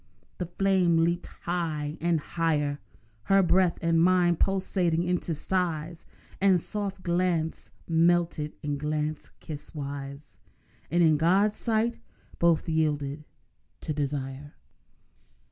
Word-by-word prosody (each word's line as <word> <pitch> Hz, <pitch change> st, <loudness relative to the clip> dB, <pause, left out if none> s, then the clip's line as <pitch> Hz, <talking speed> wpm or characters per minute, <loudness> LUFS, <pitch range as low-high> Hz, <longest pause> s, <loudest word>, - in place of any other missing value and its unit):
The 180 Hz, -, -2 dB
flame 180 Hz, -1 st, +2 dB
leaped 170 Hz, +1 st, 0 dB, 0.2 s
high 160 Hz, -4 st, -2 dB
and 170 Hz, -1 st, +2 dB
higher; 150 Hz, -2 st, -1 dB, 0.5 s
Her 195 Hz, 0 st, +4 dB
breath 180 Hz, -1 st, +3 dB
and 165 Hz, 0 st, +3 dB
mine 175 Hz, -1 st, +4 dB
pulsated 185 Hz, -2 st, +1 dB
into 175 Hz, -2 st, -1 dB
sighs, 165 Hz, -1 st, -2 dB, 0.3 s
And 190 Hz, -2 st, +5 dB
soft 200 Hz, 0 st, -4 dB
glance 170 Hz, -2 st, 0 dB, 0.2 s
melted 165 Hz, -2 st, +2 dB
into 145 Hz, -1 st, -2 dB
glance 150 Hz, +1 st, -2 dB
kiss 150 Hz, 0 st, -8 dB
wise, 140 Hz, 0 st, -7 dB, 0.5 s
And 175 Hz, +2 st, +3 dB
in 155 Hz, -2 st, +5 dB
God's 190 Hz, +7 st, +3 dB
sight 230 Hz, 0 st, 0 dB, 0.4 s
both 170 Hz, 0 st, +3 dB
yielded 150 Hz, -2 st, -1 dB, 0.6 s
to 155 Hz, -, -2 dB
desire. 145 Hz, 0 st, -4 dB
165 Hz, 110 wpm, -27 LUFS, 150-180 Hz, 0.6 s, And